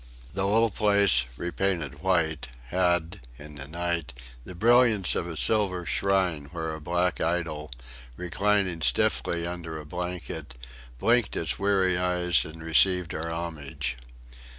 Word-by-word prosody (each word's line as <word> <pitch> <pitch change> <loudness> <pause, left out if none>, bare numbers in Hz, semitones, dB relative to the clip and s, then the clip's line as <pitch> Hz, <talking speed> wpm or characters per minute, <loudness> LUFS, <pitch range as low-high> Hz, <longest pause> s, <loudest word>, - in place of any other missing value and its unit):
The 95 +1 0
little 115 +2 +3
place, 100 - +4
repainted 85 -5 -2
white, 85 -7 0 0.2
had, 90 -1 0 0.2
in 75 +2 -11
the 70 -2 -7
night, 85 -3 -3 0.3
the 90 - -10
brilliance 115 -1 +4
of 85 - -2
a 80 -2 -6
silver 95 -3 +2
shrine 90 -4 0
where 80 +1 -5
a 80 - -8
black 90 +3 0
idol, 80 -3 -2 0.5
reclining 95 0 0
stiffly 85 +2 +1
under 85 -2 -6
a 75 - -10
blanket, 85 -5 -6 0.4
blinked 120 - +2
its 75 -6 -1
weary 95 -3 +2
eyes 90 -2 +2
and 80 +1 -10
received 90 +2 +3
our 80 +1 -4
homage. 80 -7 -4
85 Hz, 130 wpm, -26 LUFS, 80-95 Hz, 0.5 s, place